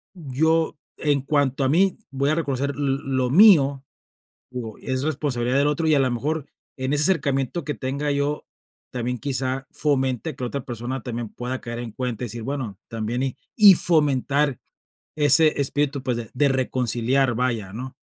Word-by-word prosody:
yo, 160 Hz, +1 st, 0 dB, 0.2 s
en 145 Hz, -3 st, +1 dB
cuanto 140 Hz, -1 st, 0 dB
a 130 Hz, -, +2 dB
mí, 185 Hz, +5 st, +2 dB
voy 140 Hz, +1 st, 0 dB
a -, -, +1 dB
reconocer 140 Hz, -3 st, -1 dB
l 135 Hz, -2 st, 0 dB
lo 130 Hz, -2 st, -1 dB
mío. 145 Hz, -8 st, +6 dB, 0.7 s
Digo, 115 Hz, -4 st, -6 dB
es 130 Hz, 0 st, -3 dB
responsabilidad 135 Hz, -4 st, -1 dB
del 145 Hz, +1 st, +3 dB
otro, 150 Hz, +2 st, -1 dB
y 155 Hz, -, +4 dB
a -, -, +3 dB
la 130 Hz, -1 st, +2 dB
mejor, 145 Hz, +5 st, -2 dB, 0.3 s
en 130 Hz, +2 st, -2 dB
ese 150 Hz, +1 st, +4 dB
acercamiento, 140 Hz, -3 st, +1 dB
que 150 Hz, -, -2 dB
tenga 140 Hz, +2 st, -2 dB
yo, 140 Hz, +1 st, -1 dB, 0.5 s
también, 125 Hz, 0 st, -2 dB
quizá 135 Hz, -1 st, -2 dB
fomente 135 Hz, 0 st, -1 dB
que 125 Hz, -, -6 dB
la -, -, -1 dB
otra 140 Hz, 0 st, -5 dB
persona 120 Hz, +2 st, -5 dB
también 120 Hz, -1 st, -4 dB
pueda 125 Hz, +1 st, -5 dB
caer 120 Hz, 0 st, -6 dB
en 120 Hz, -2 st, -6 dB
cuenta 125 Hz, -1 st, -4 dB
y -, -, -2 dB
decir: 115 Hz, +1 st, -6 dB
"Bueno, 125 Hz, -7 st, -5 dB
también 115 Hz, +3 st, -3 dB
y". 130 Hz, -, -2 dB, 0.2 s
Y 205 Hz, -4 st, +9 dB
fomentar 145 Hz, -4 st, +2 dB, 0.6 s
ese 150 Hz, 0 st, +5 dB
espíritu, 140 Hz, -1 st, -1 dB
pues, 125 Hz, -3 st, -1 dB
de 115 Hz, -3 st, -6 dB
de 140 Hz, +2 st, +2 dB
reconciliar, 130 Hz, -1 st, +1 dB
vaya, 115 Hz, -6 st, -1 dB
¿no? 130 Hz, +3 st, -7 dB
135 Hz, 175 wpm, -23 LUFS, 125-145 Hz, 0.7 s, Y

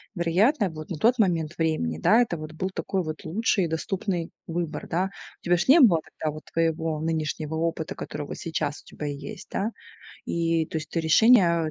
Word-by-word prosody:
Вероятно, 195 Hz, -, +2 dB
вот 155 Hz, -1 st, -9 dB
на 170 Hz, -, -4 dB
тот 240 Hz, +10 st, +3 dB
момент 170 Hz, -5 st, +1 dB
времени, 155 Hz, -, 0 dB
да, 225 Hz, -, +5 dB
это 200 Hz, -9 st, 0 dB
вот 155 Hz, 0 st, -8 dB
был 185 Hz, +4 st, -3 dB
такой 190 Hz, 0 st, -2 dB
вот 155 Hz, -1 st, -6 dB
лучший 195 Hz, +2 st, +1 dB
и -, -, -1 dB
доступный 175 Hz, +1 st, -2 dB, 0.2 s
выбор, 170 Hz, -1 st, -3 dB
да. 180 Hz, +3 st, 0 dB, 0.3 s
У -, -, -49 dB
тебя 175 Hz, 0 st, +4 dB
же 170 Hz, -, 0 dB
не 320 Hz, +5 st, +8 dB
было 175 Hz, -10 st, +6 dB, 0.3 s
вот 155 Hz, 0 st, -3 dB
твоего 160 Hz, -1 st, 0 dB
нынешнего 160 Hz, -1 st, -2 dB
опыта, 160 Hz, -1 st, -2 dB
который 145 Hz, -, -6 dB
вот -, -, -6 dB
сейчас 160 Hz, -3 st, -3 dB
у -, -, -38 dB
тебя 150 Hz, -, -6 dB
есть, 140 Hz, -1 st, -7 dB
да. 210 Hz, +4 st, -1 dB, 0.6 s
И, 165 Hz, -1 st, +1 dB
то 160 Hz, -, -3 dB
есть 155 Hz, -1 st, -8 dB
ты 165 Hz, -, 0 dB
решение, 170 Hz, -2 st, +5 dB
165 Hz, 195 wpm, -26 LUFS, 155-185 Hz, 0.6 s, не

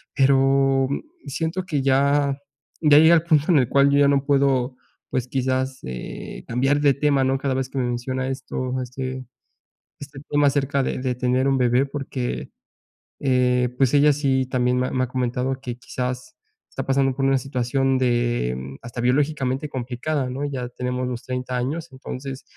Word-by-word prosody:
Pero 135 Hz, -1 st, +3 dB, 0.4 s
siento 165 Hz, +6 st, -2 dB
que 150 Hz, -6 st, -1 dB
ya, 140 Hz, +1 st, +2 dB, 0.4 s
ya 150 Hz, -2 st, +6 dB
llega 165 Hz, +2 st, +7 dB
el 160 Hz, -, +3 dB
punto 155 Hz, -3 st, +3 dB
en 150 Hz, -, +5 dB
el 125 Hz, -1 st, +1 dB
cual 140 Hz, +1 st, +4 dB
yo 140 Hz, -, +3 dB
ya 140 Hz, -, +5 dB
no 140 Hz, -1 st, +2 dB
puedo, 135 Hz, -3 st, +2 dB, 0.3 s
pues, 125 Hz, -1 st, -2 dB
quizás, 130 Hz, 0 st, -1 dB
eh, 65 Hz, -1 st, -7 dB
cambiar 135 Hz, +5 st, +1 dB
de 140 Hz, -2 st, +5 dB
tema, 140 Hz, -2 st, +2 dB
¿no? 135 Hz, +1 st, +1 dB
Cada 135 Hz, -1 st, -1 dB
vez 130 Hz, -1 st, -2 dB
que 135 Hz, -, -8 dB
me 125 Hz, -, 0 dB
menciona 130 Hz, +2 st, -2 dB
esto, 130 Hz, -1 st, -3 dB
este, 130 Hz, +1 st, -5 dB, 0.7 s
este 145 Hz, -1 st, -10 dB
tema 145 Hz, 0 st, +3 dB
acerca 140 Hz, 0 st, +1 dB
de -, -, -2 dB
de 130 Hz, -1 st, -1 dB
tener 125 Hz, +2 st, +1 dB
un 135 Hz, -1 st, +2 dB
bebé, 125 Hz, +2 st, +3 dB
porque, 135 Hz, -3 st, -4 dB, 0.7 s
eh, 125 Hz, -2 st, +2 dB
pues 135 Hz, 0 st, +2 dB
ella 145 Hz, +1 st, +6 dB
sí 135 Hz, -2 st, +1 dB
también 125 Hz, -1 st, +1 dB
me 130 Hz, -, -1 dB
me 130 Hz, 0 st, 0 dB
ha -, -, -9 dB
comentado 125 Hz, +1 st, -2 dB
que, 120 Hz, -2 st, -5 dB
quizás, 125 Hz, 0 st, -5 dB, 0.3 s
está -, -, -5 dB
pasando 135 Hz, -1 st, +1 dB
por 135 Hz, -, -2 dB
una 135 Hz, 0 st, +3 dB
situación 135 Hz, +1 st, 0 dB
de 120 Hz, -, -1 dB
hasta 120 Hz, 0 st, -8 dB
biológicamente 140 Hz, +2 st, 0 dB
complicada, 130 Hz, +2 st, -3 dB
¿no? 135 Hz, +3 st, -4 dB
Ya 130 Hz, -4 st, -4 dB
tenemos 125 Hz, 0 st, -3 dB
los 120 Hz, -2 st, -5 dB
30 125 Hz, 0 st, -4 dB
años, 155 Hz, +7 st, -3 dB
entonces 130 Hz, 0 st, -7 dB
130 Hz, 175 wpm, -23 LUFS, 125-140 Hz, 0.7 s, llega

